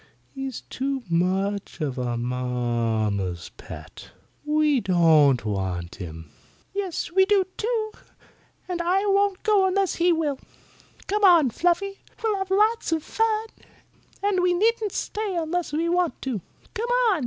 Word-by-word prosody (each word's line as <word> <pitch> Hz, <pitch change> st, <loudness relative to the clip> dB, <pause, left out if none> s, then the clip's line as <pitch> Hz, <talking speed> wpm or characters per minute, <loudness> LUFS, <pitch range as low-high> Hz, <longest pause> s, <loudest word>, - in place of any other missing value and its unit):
He's 270 Hz, -3 st, -5 dB
too 270 Hz, 0 st, -3 dB
much 190 Hz, +4 st, 0 dB
of 135 Hz, -5 st, -2 dB
a 120 Hz, -1 st, -1 dB
mamma's 115 Hz, -7 st, -1 dB
pet. -, -, -11 dB, 0.3 s
We 300 Hz, -2 st, +2 dB
don't 155 Hz, -, +4 dB
want 95 Hz, -4 st, -3 dB
him." 80 Hz, -4 st, -8 dB, 0.4 s
"Yes, 385 Hz, -4 st, -3 dB
we 380 Hz, +2 st, +5 dB
do, 400 Hz, -1 st, +4 dB
too. 440 Hz, -1 st, -1 dB, 0.8 s
And 355 Hz, -2 st, -2 dB
I 370 Hz, +4 st, +1 dB
won't 400 Hz, -1 st, +2 dB
go 410 Hz, -3 st, +4 dB
unless 385 Hz, 0 st, +1 dB
he 350 Hz, +1 st, +4 dB
will. 305 Hz, -5 st, 0 dB, 0.7 s
Come 415 Hz, +1 st, -1 dB
on, 335 Hz, -9 st, +6 dB
Fluffy. 360 Hz, -, 0 dB, 0.2 s
We'll 435 Hz, -3 st, +1 dB
have 385 Hz, -1 st, -3 dB
lots 425 Hz, +1 st, +2 dB
of 320 Hz, -2 st, 0 dB
fun. 445 Hz, 0 st, 0 dB, 0.7 s
And 400 Hz, -2 st, +2 dB
we 360 Hz, 0 st, +3 dB
needn't 435 Hz, +2 st, +1 dB
stay 420 Hz, -1 st, -3 dB
unless 340 Hz, +1 st, -1 dB
we 320 Hz, +3 st, 0 dB
want 350 Hz, -1 st, +1 dB
to. 250 Hz, -8 st, -2 dB, 0.3 s
Come 470 Hz, +1 st, -3 dB, 0.2 s
on!" 370 Hz, -, +1 dB
325 Hz, 140 wpm, -25 LUFS, -, 0.8 s, on